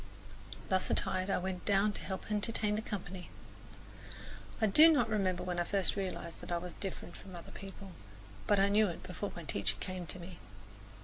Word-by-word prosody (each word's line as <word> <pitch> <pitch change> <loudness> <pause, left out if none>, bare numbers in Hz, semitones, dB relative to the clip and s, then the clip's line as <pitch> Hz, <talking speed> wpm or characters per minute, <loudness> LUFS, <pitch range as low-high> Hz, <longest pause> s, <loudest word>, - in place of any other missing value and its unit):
Thus 185 -1 +2
attired 185 +1 0
I - - +3
went 180 0 -3
down 205 +1 +3
to - - -3
help 190 +2 -5
entertain 210 0 +1
the 215 - -1
company. 190 -4 -6 1.3
I 220 - +4
do 305 +11 +8
not 305 - +4
remember 190 -5 +1
when 180 -1 -2
I - - +3
first 195 +1 +1
realized 185 -4 -4
that - - -7
I 175 - +2
was 175 0 -6
different 185 -3 -6
from 190 -2 -10
other 170 - -9
people; 195 -1 -9 0.6
but 205 -1 +4
I 195 - +5
knew 210 +1 +4
it 175 - -5
before 195 +3 -4
my 170 - -6
teacher 100 -7 0
came 185 -2 -4
to 160 - -6
me. 175 0 -9
190 Hz, 190 wpm, -34 LUFS, 180-205 Hz, 1.3 s, do